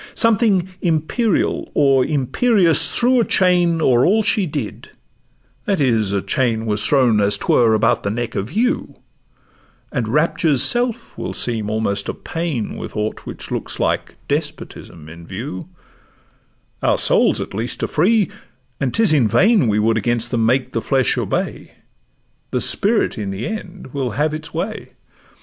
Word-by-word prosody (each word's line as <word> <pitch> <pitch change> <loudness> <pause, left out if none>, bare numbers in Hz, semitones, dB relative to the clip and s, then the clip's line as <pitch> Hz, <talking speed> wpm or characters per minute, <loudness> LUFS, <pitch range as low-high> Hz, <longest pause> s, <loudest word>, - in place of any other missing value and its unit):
Something 210 -5 +2
imperial, 175 +6 0
or 135 -2 +4
imperious, 165 - +2
threw 250 +1 +2
A - - +3
chain 175 -4 +2
o'er 125 -1 +4
all 215 +4 +3
she 205 -3 +1
did; 140 -8 -6 0.8
that 200 -2 0
is, 115 -7 +1
a 100 -1 -1
chain 115 -5 0
Was 105 -1 -1
thrown 125 -6 +3
as 100 0 +2
'twere 115 -2 +3
about 115 +2 +2
the 100 - -2
neck 120 +3 -3
of 100 +6 -4
you,— 245 - -1 1.0
And 125 -6 -2
rapture's 155 +1 +1
self 240 -1 -1
will - - -4
seem 110 -4 0
almost 105 -2 -1
a - - -3
pain 160 -9 -4
With - - -7
aught 105 +1 -4
which - - -7
looks - - -3
like - - -1
despotism 80 -3 -5
in 85 +1 -12
view: 95 -1 -7 1.1
Our - - +2
souls - - +2
at - - -6
least 115 +5 -3
are - - +1
free, 210 0 +2 0.5
and 135 -3 -1
'tis 225 -7 +4
in 135 -7 +3
vain 205 - +3
We 105 -1 +1
would 110 +1 +2
against 120 +2 -1
them 115 -3 +1
make 125 +2 0
the 115 - -1
flesh 130 +1 +1
obey— - - -3 0.7
The - - -1
spirit - - +2
in 100 -2 -3
the 95 +4 -4
end 185 - -7
will 135 -3 -2
have 150 +1 +1
its 155 +1 -6
way. 195 +7 -4
135 Hz, 160 wpm, -19 LUFS, 110-180 Hz, 1.1 s, or